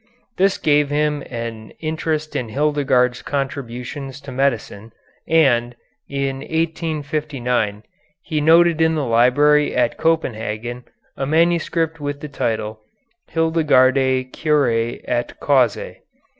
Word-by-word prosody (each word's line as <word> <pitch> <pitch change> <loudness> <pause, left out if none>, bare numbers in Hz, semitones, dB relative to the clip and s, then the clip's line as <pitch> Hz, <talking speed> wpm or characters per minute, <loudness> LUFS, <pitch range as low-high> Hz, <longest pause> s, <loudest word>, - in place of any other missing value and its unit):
This 195 +1 +3
gave 145 -1 +2
him 150 0 0
an 115 -2 -6
interest 155 -1 -3
in 125 -5 -2
Hildegarde's 135 -2 +1
contributions 135 0 -5
to 140 - -9
medicine, 115 -5 -2 0.4
and, 125 -7 +3 0.3
in 140 -1 -2
1859, 150 -9 -2 0.4
he 155 -3 -2
noted 165 +1 +5
in 160 0 +3
the 150 -3 -1
library 135 +6 +3
at 120 -1 +1
Copenhagen 120 -6 -1 0.3
a 135 - -3
manuscript 165 0 +1
with 145 -1 -4
the 150 - -7
title 110 -5 -2 0.5
"Hildegardi 130 -5 +2
Curæ 120 -7 0
et 120 0 -2
Causæ." 130 -7 +1
140 Hz, 105 wpm, -20 LUFS, 120-155 Hz, 0.5 s, noted